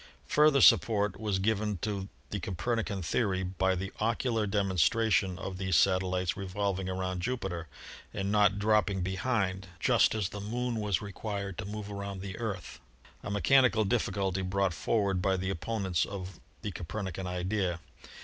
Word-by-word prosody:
Further 150 -2 +5
support 105 -5 +5
was 105 -3 0
given 105 0 0
to 100 -2 -2 0.2
the 100 - -2
Copernican 100 +2 -2
theory 95 +2 0
by 95 +1 0
the 95 +1 -4
ocular 115 0 0
demonstra 100 +2 +2
tion 95 -3 +2
of 95 -1 -6
these 95 -2 0
satellites 95 -1 +2
revolving 95 -1 -2
around 95 -1 -2
Jupiter 95 -7 -3 0.4
and 100 -1 -2
not 105 -2 +4
dropping 105 -2 +2
behind, 95 0 -1
just - - +4
as 105 -4 -1
the 100 - -7
Moon 120 +3 -2
was 105 -3 0
required 100 -1 -4
to 110 - -3
move 105 0 -6
around 100 -1 -5
the 95 -1 -6
Earth, 95 -9 -4 0.4
a - - -6
mechanical 110 +3 +4
difficulty 95 -3 0
brought 95 0 0
forward 100 0 0
by 95 0 +2
the 95 +1 -2
opponents 95 -2 -1
of 95 -3 -6 0.2
the 105 - -2
Copernican 95 +1 -5
idea. 90 0 -1
100 Hz, 150 wpm, -30 LUFS, 95-105 Hz, 0.4 s, Further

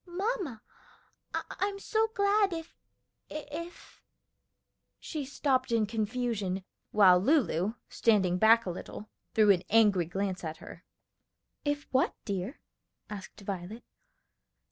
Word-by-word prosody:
"Mamma, 360 - -3 0.7
I'm 395 +1 -2
so 440 +2 +1
glad, 400 -1 +3
if 325 0 -7 0.5
if 305 +3 -8 0.5
" - - -53 0.3
She 305 -3 -4
stopped 260 -2 0
in 225 -2 +3
confusion, 215 -3 -2 0.3
while 185 -4 +6
Lulu, 210 - +2
standing 190 -5 +2
back 225 +2 +6
a 180 - -2
little, 200 +4 -8 0.2
threw 215 -2 +6
an 180 -3 +3
angry 205 -5 +4
glance 190 +2 -3
at 160 -1 -4
her. - - -12 0.8
"If 290 0 -1
what, 260 0 +2
dear?" 200 - -4 0.5
asked 205 0 -8
Violet. 200 +3 -6
225 Hz, 115 wpm, -30 LUFS, 195-300 Hz, 0.8 s, while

